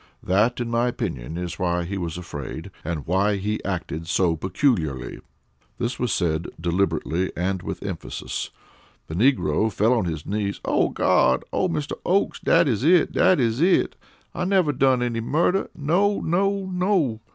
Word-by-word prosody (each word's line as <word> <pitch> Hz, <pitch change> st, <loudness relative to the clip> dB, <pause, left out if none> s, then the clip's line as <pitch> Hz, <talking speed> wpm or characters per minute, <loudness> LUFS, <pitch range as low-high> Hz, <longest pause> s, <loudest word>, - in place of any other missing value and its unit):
That, 105 Hz, +7 st, +2 dB
in 120 Hz, -, -2 dB
my 120 Hz, +1 st, +2 dB
opinion, 85 Hz, -, -4 dB
is 90 Hz, 0 st, -5 dB
why 90 Hz, -1 st, 0 dB
he 95 Hz, +4 st, -4 dB
was 85 Hz, -3 st, -4 dB
afraid, 70 Hz, -6 st, -7 dB
and 80 Hz, -3 st, -4 dB
why 100 Hz, +4 st, +2 dB
he 105 Hz, +2 st, -2 dB
acted 85 Hz, -3 st, -4 dB
so 85 Hz, 0 st, +2 dB
peculiarly." 85 Hz, -, -1 dB, 0.6 s
This 120 Hz, +1 st, -3 dB
was 125 Hz, -2 st, 0 dB
said 85 Hz, -2 st, 0 dB
deliberately, 85 Hz, 0 st, 0 dB
and 95 Hz, +1 st, -1 dB
with -, -, -6 dB
emphasis. 95 Hz, -5 st, -5 dB, 0.6 s
The -, -, -8 dB
negro 110 Hz, -, +2 dB
fell 110 Hz, +4 st, +2 dB
on 115 Hz, -6 st, +1 dB
his 80 Hz, -2 st, -4 dB
knees. 100 Hz, -1 st, -2 dB
"Oh, -, -, +2 dB
Gawd! 65 Hz, 0 st, +2 dB
Oh, 185 Hz, -, +1 dB
Mr. 150 Hz, -4 st, -3 dB
Oakes! 195 Hz, +3 st, +1 dB
Dat -, -, +3 dB
is 115 Hz, -3 st, 0 dB
it. 170 Hz, +1 st, +4 dB
Dat 185 Hz, -3 st, +4 dB
is 115 Hz, +1 st, +1 dB
it. 180 Hz, +2 st, +3 dB, 0.4 s
I 175 Hz, -, -3 dB
never 180 Hz, -5 st, +2 dB
done 130 Hz, -2 st, +3 dB
any 120 Hz, -2 st, -1 dB
murder. 170 Hz, +10 st, +1 dB
No! 180 Hz, +7 st, +2 dB
no! 195 Hz, +3 st, 0 dB
_no! 180 Hz, -, 0 dB
105 Hz, 165 wpm, -24 LUFS, 85-145 Hz, 0.6 s, it